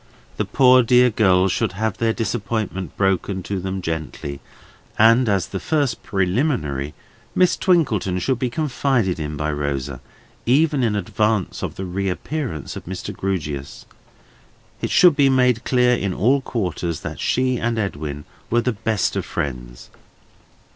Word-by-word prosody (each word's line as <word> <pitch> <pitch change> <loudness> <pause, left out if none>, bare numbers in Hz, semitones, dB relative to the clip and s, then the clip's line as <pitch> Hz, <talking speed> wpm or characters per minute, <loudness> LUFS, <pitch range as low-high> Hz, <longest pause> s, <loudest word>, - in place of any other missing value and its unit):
The - - 0
poor 130 -1 +5
dear 125 +1 +4
girls 95 -3 +3
should 110 -1 -1
have 110 +1 -2
their 115 -1 +2
disappointment 110 -5 -3
broken 95 -1 0
to 100 +1 -3
them 95 0 -4
gently, 80 -4 -4 0.6
and, 115 +2 +5
as 100 -3 +1
the 95 - -4
first 145 -4 0
preliminary, 90 - -1 0.4
Miss 180 -1 +4
Twinkleton 115 - +1
should 125 +6 0
be 125 - 0
confided 130 - 0
in 75 -1 -4
by 75 +1 -1
Rosa, 70 -3 -3 0.5
even 145 +2 +3
in 115 -4 +1
advance 105 -1 -1
of - - -4
the 95 - -5
reappearance 95 - -3
of - - -8
Mr. 95 +2 -6
Grewgious. 75 -9 -4 1.0
It - - -1
should 175 -4 +6
be 140 -2 +4
made 125 -3 +2
clear 125 -1 +3
in 100 -5 -2
all 130 +7 +3
quarters 90 - -3
that - - -6
she 130 -1 +1
and 120 0 -1
Edwin 75 -8 -4 0.2
were 120 +1 +2
the 125 - 0
best 110 -1 -1
of - - -1
friends. 60 -3 -5
100 Hz, 145 wpm, -21 LUFS, 90-125 Hz, 1.0 s, should